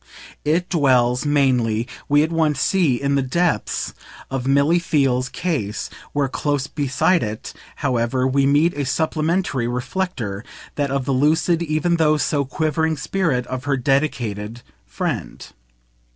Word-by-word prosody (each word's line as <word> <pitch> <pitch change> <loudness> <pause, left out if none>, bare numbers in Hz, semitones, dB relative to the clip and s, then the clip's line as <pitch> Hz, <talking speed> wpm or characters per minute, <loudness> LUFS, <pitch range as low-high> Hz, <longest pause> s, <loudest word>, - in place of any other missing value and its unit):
It 165 +4 +1
dwells 130 -4 +2
mainly, 125 -6 +2 0.2
we 145 +1 +5
at 160 - -2
once 155 -4 +1
see, 155 -8 +2
in 140 0 0
the 140 - +2
depths 135 - -1 0.4
of 135 -1 -2
Milly 140 +5 +3
Theale's 135 -6 +1
"case," 135 - -3 0.2
where, 145 -1 0
close 145 +1 -1
beside 150 +5 +1
it, 110 -1 -5 0.3
however, 125 0 +1
we 135 +1 +2
meet 150 +5 +3
a 145 - -2
supplementary 155 -1 0
reflector, 120 - -3 0.3
that 145 -1 -1
of 135 -1 -1
the 140 - -1
lucid 160 +5 +2
even 170 +1 +1
though 155 -1 +3
so 145 -1 0
quivering 155 +3 0
spirit 140 -4 -1
of 130 +2 -5
her 140 -1 +1
dedicated 120 -5 -1 0.2
friend. - - -4
140 Hz, 135 wpm, -21 LUFS, 125-155 Hz, 0.4 s, we